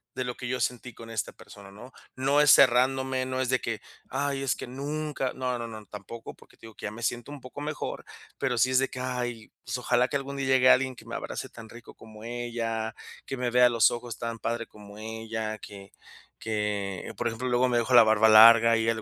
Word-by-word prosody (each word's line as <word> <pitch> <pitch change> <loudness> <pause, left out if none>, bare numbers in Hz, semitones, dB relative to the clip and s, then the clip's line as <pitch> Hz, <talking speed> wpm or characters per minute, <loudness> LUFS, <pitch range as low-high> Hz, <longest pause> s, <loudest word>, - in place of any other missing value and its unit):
de 130 - -2
lo 125 0 -4
que 125 - -6
yo 125 +1 -2
sentí 125 0 -3
con 115 +1 -12
esta 110 -2 -3
persona?, 100 -1 -14
¿no? 115 +6 -12 0.2
No 135 +3 +2
es 150 0 +6
cerrándome, 130 +1 +3
no 130 0 -2
es 130 - -1
de 130 0 +2
que: 115 -2 -4 0.3
"Ay, 140 -1 -2
es 135 - +1
que - - -8
nunca". 140 +1 -3
No, 125 -1 -2
no, 115 - -4
no, 110 -1 -9
tampoco, 105 +3 -9
porque - - -21
te - - -13
digo 110 - -15
que - - -8
ya 105 - -3
me 115 +2 -10
siento 120 +3 -2
un 145 -2 -9
poco 130 +3 -10
mejor, 150 0 -5 0.3
pero 125 -2 0
sí 130 - +4
es 130 - +3
de 135 - 0
que: 125 - -8
"Ay, 120 -3 -4
pues - - -3
ojalá 125 0 +2
que 140 - 0
algún 140 0 -6
día 135 - -2
llegue 130 -1 +5
alguien 130 0 +4
que - - -14
me - - -7
abrace - - -5
tan 115 -1 -12
rico 120 0 -13
como 110 -1 -14
ella, 115 -1 -3 0.3
que 135 - -5
me 125 -1 -1
vea 125 0 +6
a - - +2
los 115 -1 +4
ojos 120 -1 -6
tan 115 -1 -4
padre 115 +1 -3
como 105 -1 -14
ella, 110 0 -5
que 100 -2 -11 0.5
que". 105 -3 -3
Por 120 - -1
ejemplo, 120 +2 -3
luego 125 +1 +3
me 120 - +1
dejo 120 +2 -1
la 120 - +10
barba 110 0 +4
larga 115 +1 +8
y - - 0
a - - 0
ella 115 - +3
le 110 - -6
120 Hz, 245 wpm, -27 LUFS, 110-130 Hz, 0.5 s, la